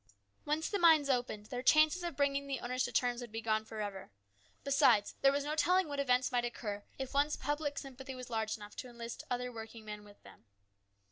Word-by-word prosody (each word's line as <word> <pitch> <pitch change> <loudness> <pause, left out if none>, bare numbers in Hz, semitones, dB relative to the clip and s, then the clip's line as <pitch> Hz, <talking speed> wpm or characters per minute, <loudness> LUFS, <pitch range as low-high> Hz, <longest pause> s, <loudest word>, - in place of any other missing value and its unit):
Once 305 +2 0
the 405 - -1
mines 315 -5 +6
opened 245 -4 -1
up - - -18
their 250 -1 -2
chances 310 +6 +5
of 340 -4 -3
bringing 280 0 +1
the 270 -2 -2
owners 250 +1 -1
to - - -2
terms 245 -1 +1
would 240 -2 -8
be 225 - -4
gone 220 -1 0
for 220 0 -6
ever. 200 -2 -5 0.5
Besides, 275 -7 +4
there 275 - +6
was 280 0 0
no 300 +1 -2
telling 360 +3 +3
what 285 -1 -4
events 255 -2 +2
might 245 -1 +1
occur 210 -4 -4
if 265 0 -5
once 290 +2 +2
public 290 -1 -2
sympathy 265 0 -7
was 255 -1 -8
large 220 -1 -1
enough 210 -1 -11
to 255 - -6
enlist 235 -1 -7
other 250 0 -2
working 225 -1 -9
men 210 0 -7
with 205 -1 -16
them. - - -16
250 Hz, 220 wpm, -34 LUFS, 225-285 Hz, 0.5 s, mines